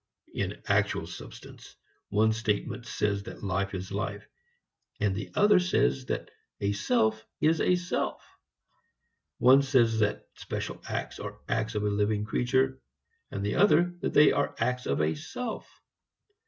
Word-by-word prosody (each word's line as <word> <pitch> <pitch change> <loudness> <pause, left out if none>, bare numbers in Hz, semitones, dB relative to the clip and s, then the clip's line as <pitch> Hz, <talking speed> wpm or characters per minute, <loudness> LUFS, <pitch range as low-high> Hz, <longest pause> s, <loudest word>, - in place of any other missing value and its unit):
In - - -3
actual - - +1
substance, - - -11 0.3
one 110 +2 +3
statement 110 +2 -2
says 100 -1 0
that - - -9
life 100 +1 -1
is 95 0 -6
life; 100 +1 -4 0.7
and 100 -2 +1
the 105 - -5
other 205 -2 +6
says 180 -7 +1
that - - -3 0.3
a 100 0 0
self 110 +2 +1 0.2
is 160 +1 +3
a 180 - +4
self. 180 0 -2 1.2
One 130 +3 +7
says 120 -5 +3
that 105 -1 0
special - - -5
acts - - -4
are - - -7
acts 110 -1 -1
of 105 - 0
a - - +1
living 105 +1 0
creature 130 +4 +1 0.5
and 100 - -4
the 105 - -1
other 175 -2 +4
that - - -2
they 150 0 +7
are 145 - 0
acts 125 0 -1
of 70 +2 +1
a 75 +1 +2
self. 225 - -6
110 Hz, 150 wpm, -28 LUFS, 100-135 Hz, 1.2 s, One